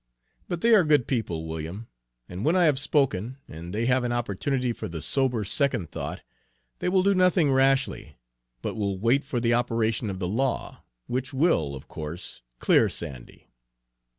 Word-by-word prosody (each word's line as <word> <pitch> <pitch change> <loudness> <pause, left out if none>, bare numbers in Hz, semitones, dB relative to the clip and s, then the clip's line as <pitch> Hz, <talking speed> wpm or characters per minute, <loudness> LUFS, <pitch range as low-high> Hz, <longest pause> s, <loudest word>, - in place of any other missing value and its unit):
But 175 -2 -3
they 230 0 +5
are 205 -4 +7
good 150 -6 +3
people, 90 - -2
William, 80 +8 -6 0.4
and 90 +3 -6
when 160 +6 +3
I 185 - +4
have 145 -4 +3
spoken, 135 - 0
and 85 +3 -8
they 110 +4 -1
have 130 +1 +2
an 120 - -1
opportunity 120 +2 -1
for 110 - -6
the 85 -3 -6
sober 125 - +1
second 125 - -1
thought, - - -5 0.6
they - - 0
will 185 0 +3
do 200 +1 +4
nothing 180 -5 +3
rashly, 135 - +1 0.5
but - - -2
will 100 -3 -2
wait 120 +8 +2
for 130 -2 -2
the 120 0 +2
operation 115 -2 0
of 95 - -4
the 90 -1 -2
law, 125 +8 -2 0.2
which 130 +2 -3
will, 85 - +2
of 65 - -11
course, 80 -2 -7 0.2
clear - - +4
Sandy." 60 -2 -9
120 Hz, 175 wpm, -26 LUFS, 95-140 Hz, 0.6 s, are